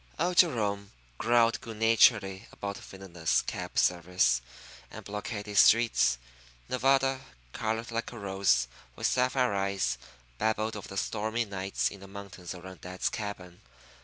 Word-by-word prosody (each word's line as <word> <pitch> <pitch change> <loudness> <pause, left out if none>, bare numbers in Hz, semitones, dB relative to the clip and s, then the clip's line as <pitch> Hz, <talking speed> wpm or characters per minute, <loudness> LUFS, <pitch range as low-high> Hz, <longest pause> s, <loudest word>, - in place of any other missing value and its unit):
Old 175 +2 0
Jerome 105 - +2 0.3
growled 115 0 +3
good 115 -2 -8
naturedly 110 -3 +4
about 100 0 -5
villainous 90 -4 -2
cab - - -5
service 90 -8 +2 0.5
and - - -10
blockaded 105 0 -2
streets. 110 - +5 0.5
Nevada, 135 +1 +2 0.3
colored 110 +2 -2
like 115 0 -3
a 120 - -9
rose, 95 - +2 0.3
with - - -4
sapphire 125 -2 +2
eyes, 95 -11 0 0.4
babbled 110 0 0
of 105 - -7
the 95 - -8
stormy 110 +3 -1
nights 95 -1 -2
in 100 - -10
the 100 - -11
mountains 100 -2 -8
around 90 -1 -11
dad's 90 +1 -2
cabin. 95 -4 -6
100 Hz, 135 wpm, -29 LUFS, 95-115 Hz, 0.5 s, streets